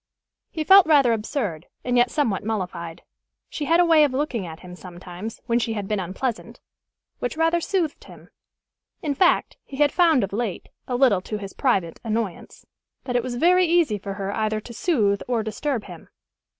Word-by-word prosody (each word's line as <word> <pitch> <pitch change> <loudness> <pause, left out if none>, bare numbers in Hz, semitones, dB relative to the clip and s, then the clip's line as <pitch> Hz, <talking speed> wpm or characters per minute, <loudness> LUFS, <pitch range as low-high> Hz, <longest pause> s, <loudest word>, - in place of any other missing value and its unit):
He 315 - -3
felt 385 +1 +7
rather 280 -6 +5
absurd, 210 - -3 0.2
and 245 0 -1
yet 245 0 +4
somewhat 235 -11 0
mollified. 180 -6 -4 0.5
She 295 - -4
had 330 +3 +3
a 355 - +5
way 325 -2 +6
of 285 -3 +1
looking 260 -8 -2
at 160 0 -10
him, 180 -1 -10
sometimes, 180 +4 -9
when 235 0 +1
she 230 -1 -1
had 205 -3 -4
been 210 -1 -1
unpleasant, 195 +6 -4 0.6
which 245 +5 -3
rather 330 +1 +2
soothed 335 -4 -2
him. - - -15 0.7
In 295 -3 0
fact, 350 +5 +2
he 270 - -10
had 295 -1 +3
found 325 - +4
of 195 - -4
late, 215 -3 -3 0.2
a 250 - -2
little 245 -7 +3
to 215 +3 -5
his 200 -1 -8
private 190 - 0
annoyance, 220 -5 -4 0.4
that 245 - -4
it 245 - +3
was 245 0 -5
very 360 +7 +4
easy 325 -11 +2
for 195 0 -6
her 200 0 -4
either 215 -1 0
to 235 +2 -11
soothe 215 - +1
or 240 -3 0
disturb 235 +2 -3
him. - - -12
235 Hz, 190 wpm, -23 LUFS, 200-295 Hz, 0.7 s, felt